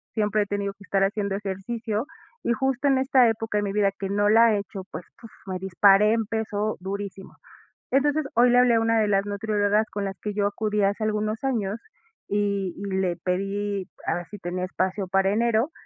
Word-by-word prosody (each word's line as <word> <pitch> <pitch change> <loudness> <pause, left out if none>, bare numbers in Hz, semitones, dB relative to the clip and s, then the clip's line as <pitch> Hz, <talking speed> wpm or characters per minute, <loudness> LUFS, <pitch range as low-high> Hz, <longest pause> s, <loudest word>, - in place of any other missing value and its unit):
siempre 210 -1 +1
he - - -7
tenido 200 0 -2
que 200 - -17
estar 195 -1 +1
haciendo 200 0 -1
ejercicio, 210 +4 -3 0.4
y 235 - +1
justo 265 +2 0
en 270 - +4
esta 260 -2 +4
época 225 -1 -1
de - - 0
mi 200 - -2
vida, 200 -1 +2
que 195 - -3
no 205 +1 +2
la 225 +1 +6
he - - +1
hecho, 200 -1 -7
pues, 175 - -7 0.2
puf, 225 -2 -12
me 185 -2 -4
disparé, 195 +3 +4
en 225 -1 0
peso 215 -1 -2
durísimo. 195 0 -6 0.5
Entonces, 290 +3 +2
hoy 245 +1 +5
le 245 - +4
hablé 250 -2 +5
a - - +4
una 225 0 +2
de 215 - +2
las 195 -1 +2
nutriólogas, 205 +1 0
con 200 -1 -3
las 195 -1 -5
que 210 - -4
yo 200 0 +1
acudí 210 0 -1
hace 200 +2 0
algunos 215 +2 -1
años, 220 -5 -1 0.5
y 200 -3 -1
y 200 - -6
le 185 -3 0
pedí, 195 +2 -2 0.2
haber 175 - -1
si 205 - -10
tenía 180 0 -4
espacio 190 +1 -2
para 195 +1 +2
enero, 235 +5 +1
205 Hz, 205 wpm, -25 LUFS, 195-225 Hz, 0.5 s, la